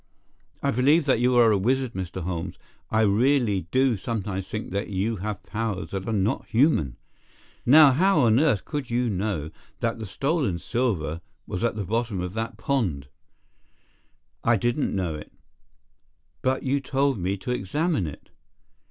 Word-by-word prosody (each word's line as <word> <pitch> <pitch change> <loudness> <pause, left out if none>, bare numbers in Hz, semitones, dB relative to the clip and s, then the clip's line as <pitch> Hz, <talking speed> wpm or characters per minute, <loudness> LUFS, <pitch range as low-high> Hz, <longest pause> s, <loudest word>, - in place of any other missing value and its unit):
"I - - +2
believe 145 +7 +3
that 130 -5 +3
you 125 +1 +3
are 120 -2 +6
a 100 - +2
wizard, 130 +3 0
Mr. 95 -1 -5
Holmes. 85 0 -4 0.3
I 110 - +2
really 110 - +2
do 130 0 +3
sometimes 95 -3 -3
think 105 -1 -5
that 100 +3 -2
you 105 +3 -1
have 105 +2 -5
powers 105 -3 -3
that 95 +1 -4
are - - -1
not 105 0 0
human. 110 - +2 0.7
Now, 145 +2 +8
how 175 +4 +3
on 115 -1 +4
earth 135 - +2
could 145 -5 -4
you 120 0 +1
know 95 -6 -2 0.3
that 115 -1 -1
the 110 - -5
stolen 135 - 0
silver 85 -8 -1 0.2
was 90 - -4
at 120 - +1
the 105 -2 -3
bottom 110 0 -1
of 90 0 -4
that 110 +1 -4
pond?" 90 - -1 1.3
"I 120 - +4
didn't 120 +5 0
know 90 -4 -1
it." 75 - -9 1.1
"But 130 +1 0
you 140 +1 +1
told 135 -2 0
me 95 +3 -1
to 110 +6 -5
examine 130 - 0
it." 75 - -10
110 Hz, 160 wpm, -25 LUFS, 95-130 Hz, 1.3 s, Now